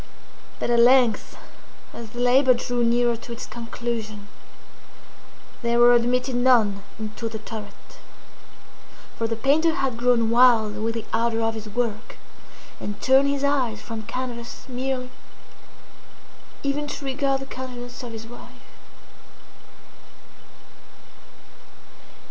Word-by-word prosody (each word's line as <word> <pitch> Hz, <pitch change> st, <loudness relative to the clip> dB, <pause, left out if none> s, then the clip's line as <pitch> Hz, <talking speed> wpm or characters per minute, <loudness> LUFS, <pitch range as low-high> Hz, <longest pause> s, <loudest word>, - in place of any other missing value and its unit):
But -, -, -2 dB
at 235 Hz, -, +4 dB
length, 245 Hz, -2 st, +4 dB, 0.6 s
as 230 Hz, -2 st, -8 dB
the 240 Hz, -, -9 dB
labor 255 Hz, +1 st, +5 dB
drew 240 Hz, 0 st, -1 dB
nearer 240 Hz, 0 st, +2 dB
to 235 Hz, -, -11 dB
its 235 Hz, -, -7 dB
conclusion, 230 Hz, -3 st, -5 dB, 1.3 s
there 235 Hz, -1 st, +1 dB
were 240 Hz, 0 st, +7 dB
admitted 250 Hz, +2 st, +2 dB
none 240 Hz, -5 st, +3 dB, 0.2 s
into 220 Hz, +1 st, -5 dB
the 220 Hz, -, -5 dB
turret; 215 Hz, -1 st, -10 dB, 1.2 s
for 230 Hz, -, -1 dB
the 225 Hz, -, -2 dB
painter 305 Hz, +8 st, +2 dB
had 265 Hz, -9 st, -1 dB
grown 235 Hz, -2 st, +2 dB
wild 230 Hz, -3 st, +5 dB
with 225 Hz, +1 st, -2 dB
the 225 Hz, -, -4 dB
ardor 230 Hz, 0 st, +1 dB
of 225 Hz, 0 st, +1 dB
his 220 Hz, -1 st, -7 dB
work, 220 Hz, 0 st, -3 dB, 0.6 s
and 205 Hz, -, -5 dB
turned 265 Hz, +1 st, +4 dB
his 280 Hz, 0 st, -1 dB
eyes 260 Hz, -6 st, +1 dB
from 225 Hz, -1 st, -6 dB
canvas 235 Hz, +1 st, -6 dB
merely, 255 Hz, 0 st, -3 dB, 1.5 s
even 285 Hz, +1 st, -1 dB
to 285 Hz, -, -6 dB
regard 270 Hz, 0 st, 0 dB
the -, -, -5 dB
countenance 250 Hz, -2 st, -8 dB
of 245 Hz, -2 st, -7 dB
his 225 Hz, 0 st, -8 dB
wife. 240 Hz, +1 st, -12 dB
240 Hz, 120 wpm, -24 LUFS, 225-255 Hz, 1.5 s, were